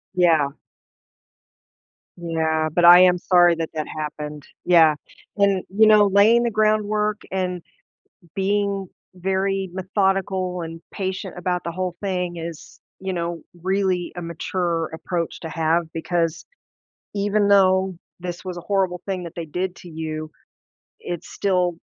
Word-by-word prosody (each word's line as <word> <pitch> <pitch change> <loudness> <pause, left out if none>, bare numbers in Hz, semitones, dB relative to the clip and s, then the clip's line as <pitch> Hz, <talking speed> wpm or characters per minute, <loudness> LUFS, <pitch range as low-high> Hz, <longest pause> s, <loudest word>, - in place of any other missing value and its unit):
Yeah. 160 -6 +3 1.6
Yeah, 160 -2 0
but 175 -1 +3
I 175 +1 +10
am 180 -1 +5
sorry 175 -1 +4
that 165 -1 -4
that 155 -1 -3
happened. 150 -1 -6 0.2
Yeah. 165 -4 +6 0.4
And, 200 -2 +2
you 215 +3 +4
know, 210 -1 +6
laying 215 +5 +5
the 235 - 0
groundwork, 215 0 +1
and 180 -2 -2 0.7
being 200 0 0 0.3
very 190 +1 -1
methodical, 190 -1 0
and 165 0 -7
patient 190 -1 -4
about 180 0 -2
the 170 - -3
whole 180 0 -3
thing 180 -3 -2
is, 165 -1 -8 0.2
you 190 0 -3
know, 170 -2 -3 0.2
really, 190 -2 0
a 175 - -5
mature 170 0 -2
approach 170 0 -3
to 160 - -6
have, 165 +1 +1
because 165 0 -1 0.7
even 205 0 +1
though 190 -2 +4 0.2
this 175 0 -6
was 185 -1 -5
a - - -5
horrible 185 -2 0
thing 185 -2 -3
that 170 - -8
they 170 - -4
did 180 +4 -3
to 180 - -12
you, 155 -1 -5 0.7
it's 175 0 -6
still 180 -3 0
180 Hz, 135 wpm, -22 LUFS, 170-195 Hz, 1.6 s, I